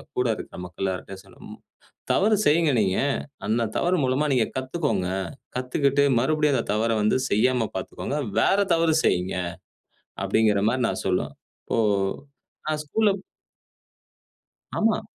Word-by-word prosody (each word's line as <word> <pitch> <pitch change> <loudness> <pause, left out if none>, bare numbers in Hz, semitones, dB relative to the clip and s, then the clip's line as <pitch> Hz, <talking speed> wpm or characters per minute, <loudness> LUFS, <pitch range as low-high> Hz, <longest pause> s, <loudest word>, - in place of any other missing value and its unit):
கூட 125 - +1
இருக்க - - -9
மக்கள் 90 +1 -7
எல்லார்கிட்டயும் 95 +1 -5
சொல்லும். - - -17
மு. - - -10 0.5
தவறு 215 +2 +3
செய்ங்க 155 +1 +4
நீங்க. 95 -3 +1 0.5
அந்த 115 +2 +1
தவறு 180 +1 +2
மூலமா 130 +3 +1
நீங்க 125 -3 +3
கத்துக்கோங்க. 130 - -1 0.5
கத்துக்கிட்டு 140 +2 +1 0.2
மறுபடியும் 150 +2 +2
அந்த - - -1
தவற 110 +2 +1
வந்து 105 +3 +3
செய்யாம 115 +2 +2
பார்த்துக்கோங்க. 95 +9 -4 0.2
வேற 195 - +3 0.2
தவறு 165 -1 +3
செய்யுங்க. 90 +1 +1 0.9
அப்படிங்கிற 105 -3 +2
மாரி 125 +1 0
நான் - - -3
சொல்லுவேன். 90 -7 0 0.3
இப்போ - - -1 0.9
நான் 155 -1 -1
ஸ்கூல்ல 215 +7 +2 1.7
ஆமா. 220 0 +2
130 Hz, 125 wpm, -25 LUFS, 105-150 Hz, 1.7 s, செய்ங்க